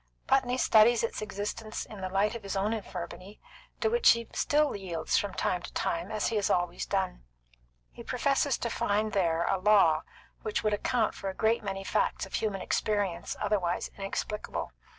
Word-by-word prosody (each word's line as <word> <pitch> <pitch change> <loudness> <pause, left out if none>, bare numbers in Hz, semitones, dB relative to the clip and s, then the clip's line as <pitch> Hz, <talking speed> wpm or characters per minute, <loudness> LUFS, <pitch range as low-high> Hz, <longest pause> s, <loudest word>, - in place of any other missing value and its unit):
Putney 255 -2 +2
studies 230 -1 +5
its 230 - -2
existence 210 +1 -4
in 210 -3 -10
the 185 - -3
light 200 +3 +1
of 235 - -6
his 200 -1 -5
own 205 +3 +1
infirmity, 195 -1 -7 0.4
to - - +3
which 475 +1 +6
he 230 -1 -5
still 295 0 +2
yields 170 -5 -2
from 200 -2 0
time 180 - 0
to - - -8
time, 170 +3 -1
as 215 -1 0
he 225 - -1
has 205 - +1
always 175 -1 0
done. - - -1 0.7
He - - -11
professes - - +1
to - - -3
find 210 +1 0
there 170 -4 +2
a 195 - +1
law 185 -6 +5 0.4
which 215 +1 -2
would 215 -1 +2
account 220 +2 +1
for 195 - -5
a 190 - -6
great 225 +2 +2
many 195 -1 -4
facts - - 0
of 190 - -15
human 205 -3 -1
experience 200 -5 -1
otherwise 180 -4 0
inexplicable. 205 +1 -4
205 Hz, 180 wpm, -29 LUFS, 185-220 Hz, 0.7 s, which